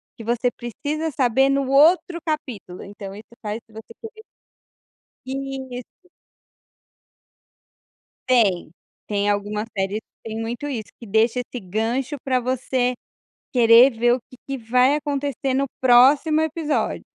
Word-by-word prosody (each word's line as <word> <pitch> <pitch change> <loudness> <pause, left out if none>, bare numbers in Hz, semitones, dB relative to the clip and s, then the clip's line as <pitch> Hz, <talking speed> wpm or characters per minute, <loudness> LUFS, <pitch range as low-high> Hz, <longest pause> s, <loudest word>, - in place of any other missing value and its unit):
que 225 - -10
você 240 +2 0
precisa 290 +8 -4
saber 265 +1 +2
no 275 -1 +1
outro 340 +5 +4
capítulo, 260 - -5
então 200 -1 -9
isso 215 +3 -13
faz 210 0 -4
se 220 - -24
você 220 +1 -11
querer 440 -1 -10 1.1
Isso. 265 +3 -7 2.2
Tem. 210 -10 +3 0.4
Tem 205 -1 0
algumas 205 +1 -2
séries 195 +2 -1
que 225 - -14
tem 220 +1 -4
muito 235 +5 -4
isso, 235 -7 -5
que 235 - -11
deixa 225 +4 +2
esse 250 0 -6
gancho 235 - -2
para 255 -2 +1
você 255 0 0 0.6
querer 235 +1 +7
ver 240 +2 +3
o 250 - +2
que 255 - -14
que 275 -1 -4
vai 250 +4 +3
acontecer 280 -3 -2
no 275 +1 +2 0.2
próximo 275 +5 +5
episódio. 315 -1 -1
250 Hz, 135 wpm, -22 LUFS, 225-275 Hz, 2.2 s, querer